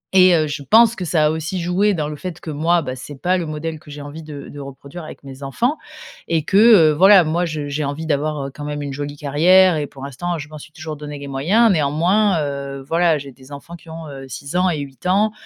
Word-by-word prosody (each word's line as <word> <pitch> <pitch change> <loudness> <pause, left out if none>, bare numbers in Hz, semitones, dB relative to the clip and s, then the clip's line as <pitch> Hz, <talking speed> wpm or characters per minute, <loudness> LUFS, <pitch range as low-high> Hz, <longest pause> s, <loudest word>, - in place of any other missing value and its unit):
Et 185 -1 +7
heu, 155 -1 +2
je 145 -1 -5
pense 225 - +5
que 185 -4 -5
ça 155 -2 +2
a 150 - +4
aussi 160 +4 -3
joué 185 +4 +1
dans 150 -2 -2
le 150 - -5
fait 175 +2 -7
que 160 - -7
moi, 165 +3 +1
bah, 130 -1 -5
c'est 135 +1 -10
pas 180 +1 +1
le 170 - -4
modèle 155 +1 -5
que 150 - -17
j'ai 145 0 -8
envie 150 +3 -9
de 150 -2 -9
de 145 - -10
reproduire 140 +4 -9
avec 155 - -11
mes 135 0 -11
enfants 240 - -1 0.5
et 165 -2 0
que, 195 - +1
heu, 205 -9 +7
voilà, 190 +3 +7
moi, 170 +3 0
je 150 -3 -4
j'ai 145 +1 -3
envie 145 +3 -4
d'avoir, 150 -1 -1
heu, 135 - -9
quand 145 - -9
même 145 0 -4
une 140 -1 -5
jolie 145 +1 -5
carrière 175 +6 +4
et 145 -1 -2
pour 135 -1 -12
l'instant, 170 +6 -4
je 150 0 -8
m'en 155 -1 -10
suis 150 - -13
toujours 155 -1 -7
donné 150 0 -7
les 140 0 -8
moyens. 190 +12 +3
Néanmoins, 170 +5 +2
heu, 140 -1 -5
voilà, 165 -2 +2
j'ai 140 -1 -9
des 130 +2 -18
enfants 145 +4 -9
qui 170 -1 -16
ont, 160 0 -8
heu, 135 -1 -9
6 140 +5 -8
ans 180 0 +3
et 160 - -1
8 135 +3 -8
ans. 210 +3 +3
155 Hz, 260 wpm, -20 LUFS, 145-175 Hz, 0.5 s, Et